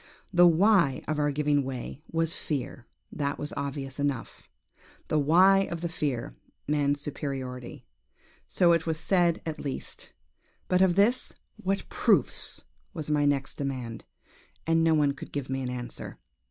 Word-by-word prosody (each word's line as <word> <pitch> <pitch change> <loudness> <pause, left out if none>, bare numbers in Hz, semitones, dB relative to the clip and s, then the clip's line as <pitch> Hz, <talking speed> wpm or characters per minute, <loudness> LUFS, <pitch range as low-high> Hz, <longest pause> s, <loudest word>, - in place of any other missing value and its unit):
"The 175 0 +7
why 170 -5 +4
of 155 0 -1
our 145 0 +2
giving 145 0 +1
way, 130 +1 -6
was 165 0 0
fear: 130 -4 -4 0.2
that 145 -1 -2
was 150 - -5
obvious 140 -1 -4
enough; 140 -4 -3 0.6
the 155 - +2
why 180 +7 +6
of 170 -1 -4
the 170 - -2
fear, 135 - -3 0.3
man's 145 -1 +1
superiority. 135 -4 -5 0.6
So 175 -2 +3
it 165 -1 +2
was 160 -1 -1
said, 175 0 +2
at 160 -2 -4
least; 140 -2 -6 0.6
but 180 0 +3
of 185 -2 +4
this, 220 +6 +3 0.2
what 195 -2 -2
proofs? - - +1 0.3
was 150 -2 -4
my 145 -1 +3
next 140 -1 0
demand; 130 -5 -4 0.6
and 165 0 +3
no 165 -1 +4
one 145 -2 +3
could 140 - -9
give 135 -2 -4
me 135 0 -1
an 125 - -3
answer! 125 -1 -5
150 Hz, 155 wpm, -28 LUFS, 135-165 Hz, 0.6 s, The